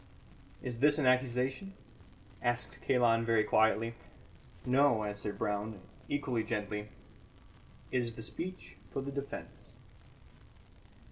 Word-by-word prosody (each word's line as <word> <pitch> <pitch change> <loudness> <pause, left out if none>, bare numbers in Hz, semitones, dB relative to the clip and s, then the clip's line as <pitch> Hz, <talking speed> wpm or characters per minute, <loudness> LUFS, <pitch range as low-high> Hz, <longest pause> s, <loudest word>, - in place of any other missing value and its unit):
"Is 120 -2 -3
this 145 +2 +5
an 150 - +1
accusation?" 130 +8 +2 0.7
asked 120 0 -1
Kalon 120 -3 +4
very 115 -1 +4
quietly. 110 +1 +3 0.7
"No," 125 -3 +4
answered 105 0 -3
Brown, 105 0 -2 0.3
equally 130 -5 0
gently, 105 -2 -3 1.0
"it 125 - +2
is 115 -1 -3
the 115 - -6
speech 180 +11 -5
for 135 - -3
the 140 - -4
defence." 140 0 -7
120 Hz, 110 wpm, -33 LUFS, 110-135 Hz, 1.0 s, this